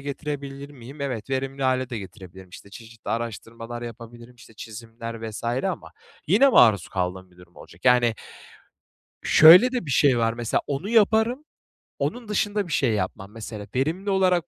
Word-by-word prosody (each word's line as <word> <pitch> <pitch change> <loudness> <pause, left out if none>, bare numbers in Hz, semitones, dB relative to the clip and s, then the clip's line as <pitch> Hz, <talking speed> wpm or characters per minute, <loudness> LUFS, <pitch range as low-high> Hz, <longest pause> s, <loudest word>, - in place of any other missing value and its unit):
getirebilir 140 0 -6
miyim? 135 +1 -12
Evet, 130 -3 -4
verimli 135 +1 -3
hâle 130 -1 0
de 115 - -4
getirebilirim. 95 -2 -12
İşte, 100 +2 -14
çeşitli 115 +1 -12
araştırmalar 115 +1 -5
yapabilirim, 120 +1 -10
işte, 115 - -17
çizimler 115 +1 -8
vs. 105 - -9
ama 130 +11 -3 0.3
yine 210 - +5
maruz 110 - +5
kaldığım 90 0 -4
bir 90 - -24
durum 90 -1 -19
olacak. 85 +7 -15
Yani, 125 -2 +4 1.1
şöyle 180 +11 +8
de 245 - -3
bir - - -4
şey 130 -2 +3
var, 115 0 +1
mesela 115 -1 -1
onu 145 +7 -4
yaparım, 225 +4 +2 0.6
onun 240 -2 -3
dışında 205 -1 -1
bir 165 - -9
şey 130 -4 +2
yapmam, 95 0 -4
mesela. 105 -2 -8
Verimli 165 +10 -1
olarak 185 -3 +2
125 Hz, 160 wpm, -24 LUFS, 115-155 Hz, 1.1 s, şöyle